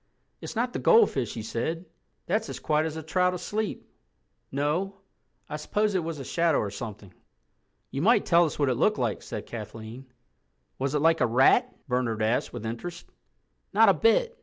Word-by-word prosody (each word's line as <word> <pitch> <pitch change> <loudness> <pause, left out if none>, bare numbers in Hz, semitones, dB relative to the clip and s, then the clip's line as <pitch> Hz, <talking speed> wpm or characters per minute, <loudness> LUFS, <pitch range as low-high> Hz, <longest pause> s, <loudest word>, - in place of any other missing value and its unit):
"It's - - -7
not 245 +2 -1
the - - -2
goldfish," 140 - +3
he 110 - -5
said. 160 +10 -3 0.4
"That's 215 +5 -1
as - - -6
quiet 155 +1 +1
as 160 0 -6
a 160 - -6
trout 180 +3 +1
asleep. 210 +4 -4 0.6
No—I 175 +3 -4
suppose 205 +7 0
it 185 -3 0
was 165 -1 -4
a 140 - -6
shadow 165 0 +2
or 100 - -1
something." 100 -3 -8 0.8
"You 135 - -3
might 215 +4 +4
tell 170 -1 +5
us 155 - -4
what 145 -2 +2
it - - +2
looked - - +2
like," - - -1
said - - -6
Kathleen. 115 +3 -8 0.7
"Was 135 +2 -1
it 150 - +1
like 165 -1 +4
a 125 - +4
rat?" 135 - +4 0.2
Bernard 125 -4 0
asked 110 +3 0
with 120 -2 -7
interest. 120 +10 -6 0.7
"Not - - +6
a - - +6
bit. 475 +1 +2
155 Hz, 180 wpm, -27 LUFS, 120-190 Hz, 0.8 s, Not